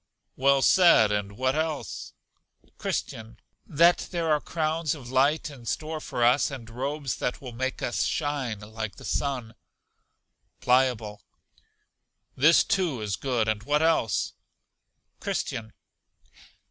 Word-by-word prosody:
Well 135 0 +3
said, 170 - +6
and 100 -1 -2
what 130 0 +1
else? 155 0 -3 0.7
Christian. 110 0 -4 0.3
That 170 +3 +4
there 170 -3 -1
are 150 -1 +3
crowns 160 -1 -1
of 125 -5 -10
light 145 +4 +2
in 125 -5 -12
store 155 +4 -3
for 120 - -2
us, 125 +4 +4
and 130 -5 -8
robes 135 +3 -3
that 125 - -2
will 130 -3 -8
make 130 +3 -3
us 120 - -1
shine 140 -8 -2
like 110 0 -6
the - - -12
sun. 130 -6 -2 1.1
Pliable. 125 -5 +1 1.1
This, 150 +5 +5
too, 180 - 0
is 105 -3 -2
good; 120 -3 -1
and 110 -1 0
what 150 +5 +1
else? 160 -10 +1 0.9
Christian. 110 -1 -3
130 Hz, 125 wpm, -26 LUFS, 115-155 Hz, 1.1 s, said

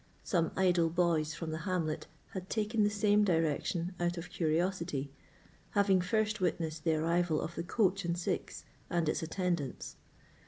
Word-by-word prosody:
Some 170 -4 +1
idle 175 -3 +3
boys 160 -2 +1
from 160 -1 -4
the 160 - -3
hamlet 160 -3 -2 0.2
had 190 -1 -6
taken 220 0 0
the 205 - +4
same 210 0 +3
direction 165 0 0
out 175 0 0
of 170 +1 -6
curiosity, 165 -3 0 0.7
having 195 -2 +4
first 215 +2 0
witnessed 160 -3 -1
the 160 -1 +3
arrival 165 0 +1
of 165 +1 -4
the 170 - -3
coach 195 +2 +1
and 170 0 -1
six 175 - -3 0.2
and 170 -2 +1
its 155 - 0
attendants. 170 -3 -2
175 Hz, 155 wpm, -32 LUFS, 160-190 Hz, 0.7 s, the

